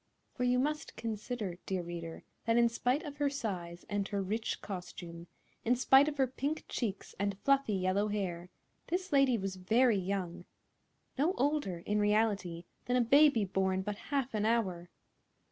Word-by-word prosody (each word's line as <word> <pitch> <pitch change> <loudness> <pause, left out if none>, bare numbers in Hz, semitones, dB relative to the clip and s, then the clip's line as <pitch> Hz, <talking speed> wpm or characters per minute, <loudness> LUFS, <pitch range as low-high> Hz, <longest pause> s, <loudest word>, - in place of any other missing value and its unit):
For 250 - -1
you 250 0 +3
must 295 +3 -1
consider, 220 -4 -4
dear 185 -2 -1
reader, 170 -1 -7 0.2
that 230 0 +3
in 235 0 +5
spite 250 +6 0
of 290 -3 -7
her 290 -1 +2
size 180 -10 -4
and 205 -1 -1
her 200 - -2
rich 210 +4 -2
costume, 175 -3 -7 0.4
in 245 +2 +3
spite 265 +3 +6
of 295 -1 -2
her 270 - +4
pink 280 +4 -3
cheeks 205 -5 -3
and 200 -1 -1
fluffy 275 -6 +3
yellow 190 +2 +1
hair, 180 -4 -3 0.4
this 365 0 -2
lady 275 -3 +5
was 195 -2 -4
very 220 +3 +3
young—no 195 - -4
older, 270 - 0
in 210 0 +1
reality, 205 -5 +1 0.2
than 245 - +1
a - - +4
baby 275 -2 +5
born 190 0 0
but 210 +1 -3
half 275 -3 0
an 210 -1 0
hour. 190 -6 0
210 Hz, 160 wpm, -32 LUFS, 185-260 Hz, 0.4 s, spite